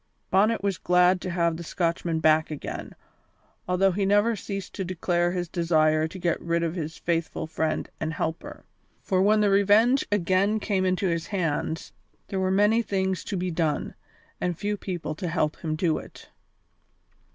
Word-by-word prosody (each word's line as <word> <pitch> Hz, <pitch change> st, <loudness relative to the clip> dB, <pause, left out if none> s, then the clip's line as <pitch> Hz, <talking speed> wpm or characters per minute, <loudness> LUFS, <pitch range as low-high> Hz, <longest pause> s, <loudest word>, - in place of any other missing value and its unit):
Bonnet 210 Hz, +3 st, +3 dB
was 195 Hz, -4 st, -1 dB
glad 180 Hz, 0 st, +3 dB
to 185 Hz, -, -4 dB
have 170 Hz, -2 st, +1 dB
the 170 Hz, -, -7 dB
Scotchman 170 Hz, -1 st, -1 dB
back 155 Hz, 0 st, +4 dB
again, 150 Hz, -2 st, -6 dB, 0.7 s
although 185 Hz, +2 st, +3 dB
he 195 Hz, +3 st, -1 dB
never 205 Hz, +4 st, +3 dB
ceased 195 Hz, -1 st, -6 dB
to 195 Hz, -, -3 dB
declare 175 Hz, -1 st, 0 dB
his 175 Hz, -1 st, -2 dB
desire 155 Hz, -2 st, +2 dB
to 175 Hz, -, -9 dB
get 175 Hz, -2 st, -1 dB
rid 170 Hz, 0 st, 0 dB
of 165 Hz, -1 st, -1 dB
this 160 Hz, -3 st, -5 dB
faithful 165 Hz, -2 st, -2 dB
friend 160 Hz, 0 st, -2 dB
and 160 Hz, 0 st, -2 dB
helper; 160 Hz, +1 st, -4 dB, 0.4 s
for, 185 Hz, -1 st, +1 dB
when 210 Hz, +2 st, +4 dB
the 205 Hz, -, +3 dB
Revenge 210 Hz, +7 st, +4 dB
again 200 Hz, +2 st, +2 dB
came 195 Hz, -3 st, 0 dB
into 185 Hz, +1 st, 0 dB
his 170 Hz, -1 st, -1 dB
hands, 165 Hz, -4 st, -2 dB, 0.4 s
there 195 Hz, -, -2 dB
were 190 Hz, 0 st, +1 dB
many 210 Hz, +4 st, +3 dB
things 190 Hz, -3 st, -1 dB
to 200 Hz, -, -3 dB
be 180 Hz, 0 st, -2 dB
done, 160 Hz, -3 st, -1 dB, 0.5 s
and 175 Hz, -2 st, -1 dB
few 210 Hz, 0 st, -1 dB
people 180 Hz, -5 st, -4 dB
to 175 Hz, +4 st, -5 dB
help 160 Hz, -2 st, 0 dB
him 155 Hz, -1 st, -3 dB
do 160 Hz, 0 st, +1 dB
it. -, -, -13 dB
180 Hz, 175 wpm, -26 LUFS, 165-195 Hz, 0.7 s, back